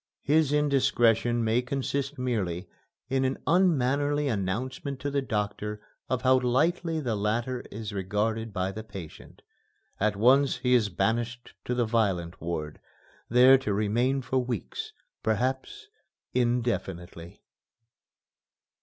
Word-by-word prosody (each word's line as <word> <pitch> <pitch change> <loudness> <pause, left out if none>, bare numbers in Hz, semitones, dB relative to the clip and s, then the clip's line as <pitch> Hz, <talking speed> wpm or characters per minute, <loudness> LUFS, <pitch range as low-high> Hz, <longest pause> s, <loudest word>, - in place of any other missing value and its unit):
His 150 0 +3
indiscretion 120 -5 +2
may 115 +2 +2
consist 140 +2 -3
merely 100 -8 -2 0.4
in 130 +1 +1
an 130 +1 0
unmannerly 145 -4 +2
announcement 130 +6 -2
to 145 - -2
the 140 0 +1
doctor 105 -3 -3 0.3
of 130 -1 -1
how 130 0 +5
lightly 160 +6 +1
the 120 -7 -1
latter 115 +5 -1
is 110 0 -6
regarded 105 +4 -1
by 95 -1 -2
the 110 +2 -7
patient. 95 -7 -11 0.6
At 105 0 +1
once 130 +6 +4
he 125 0 +1
is 115 -4 +4
banished 120 +6 -2
to 125 - -1
the 120 -1 +2
violent 95 -7 0
ward, 80 -2 -4 0.5
there 125 +3 +7
to 105 -6 -1
remain 120 +6 +1
for 130 +2 0
weeks, 120 - -4 0.3
perhaps 125 +5 -2 0.5
indefinitely. 115 -9 -2
120 Hz, 120 wpm, -28 LUFS, 105-130 Hz, 0.6 s, there